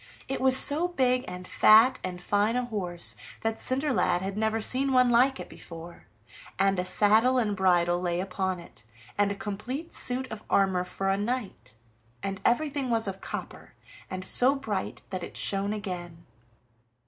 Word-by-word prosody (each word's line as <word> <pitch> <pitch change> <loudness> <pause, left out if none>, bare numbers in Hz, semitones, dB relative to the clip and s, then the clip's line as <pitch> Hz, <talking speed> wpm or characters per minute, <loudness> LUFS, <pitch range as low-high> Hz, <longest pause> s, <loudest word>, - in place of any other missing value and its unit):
It 270 - -3
was 260 0 +6
so 305 +6 +6
big, 255 -7 0
and 180 0 -8
fat, 225 +5 +5
and 180 -1 -5
fine 205 +5 0
a 250 0 -1
horse 180 -7 +1 0.3
that 225 0 -2
Cinderlad 255 -9 0
had 195 0 -4
never 220 +1 0
seen 265 +4 0
one 250 -1 +4
like 255 +3 +3
it - - -7
before, 170 0 -12 0.5
and 195 -1 +1
a 180 - -1
saddle 215 +7 +3
and 215 -4 0
bridle 175 -2 +2
lay 175 -1 -1
upon 190 0 -2
it, 170 - -13 0.3
and 205 0 +1
a - - -3
complete 245 +11 -6
suit 255 +1 -1
of 215 -1 -8
armor 190 -2 +2
for 195 +2 -3
a 195 - +1
knight, 215 - -4 0.5
and 195 -1 -4
everything 280 +1 0
was 225 -2 +2
of 195 0 -6
copper, - - -8 0.4
and 185 0 -6
so 255 +8 +3
bright 215 -9 -4
that 185 -1 -4
it - - -8
shone 200 +1 0
again. 180 -5 -6
205 Hz, 170 wpm, -27 LUFS, 185-250 Hz, 0.5 s, was